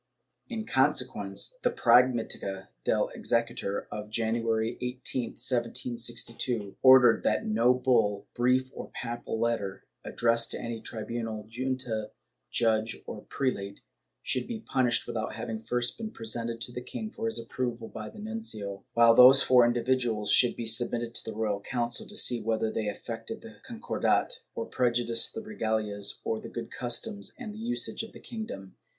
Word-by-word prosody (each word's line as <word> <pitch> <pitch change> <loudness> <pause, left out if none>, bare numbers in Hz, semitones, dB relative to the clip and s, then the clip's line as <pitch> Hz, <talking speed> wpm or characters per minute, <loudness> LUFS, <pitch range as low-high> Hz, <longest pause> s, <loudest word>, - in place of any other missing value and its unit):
In 220 -1 -4
consequence, - - 0
the - - +3
Prag 120 +1 +6
mdtica 105 -6 -4
del - - +1
Exequatur 115 -4 -1
of 105 0 -6
January 115 +1 0
18, 125 0 -2
1762, 120 -3 -2
ordered 130 -3 +8
that 110 - +1
no 115 +3 +4
bull, 115 -6 +2
brief 130 +1 +2
or - - -7
papal 120 -1 -4
letter, 110 -5 -1 0.2
addressed 115 0 +2
to - - -4
any 115 -1 -5
tribimal, 110 -1 -4
junta, 125 -2 -3 0.4
judge 110 -1 +1
or - - -8
prelate, 100 -7 -2 0.4
should 130 - -1
be 230 -2 -5
published 130 - +1
without 110 -1 -3
having 110 -2 -4
first 120 - -1
been 220 -1 -4
presented 115 - -3
to 120 - -4
the 125 - -5
king 215 - -6
for 225 - -3
his 225 - -1
approval 115 0 -3
by 105 -1 -7
the - - -14
nuncio, 210 - -4
while 115 0 +7
those 130 +3 +9
for 125 -1 +6
indi 120 0 +2
viduals 120 -5 +1
should 125 - +5
be 115 - -4
submitted 115 +1 +2
to 115 - -2
the 110 - -7
Royal 105 -2 0
Council 120 +1 -2
to - - -10
see 120 -1 +4
whether 110 0 0
they 110 -1 -2
affected 105 - -6
the - - -11
Concordat, - - 0 0.2
or 115 - -3
prejudiced 120 -2 +1
the 225 - -3
regalias 110 - -2
or 110 - -1
the - - -8
good 115 -1 -6
customs 205 - -2
and 220 -4 -7
usages 235 +3 -2
of - - -23
the - - -11
kingdom. 215 - -7
115 Hz, 155 wpm, -29 LUFS, 110-125 Hz, 0.4 s, those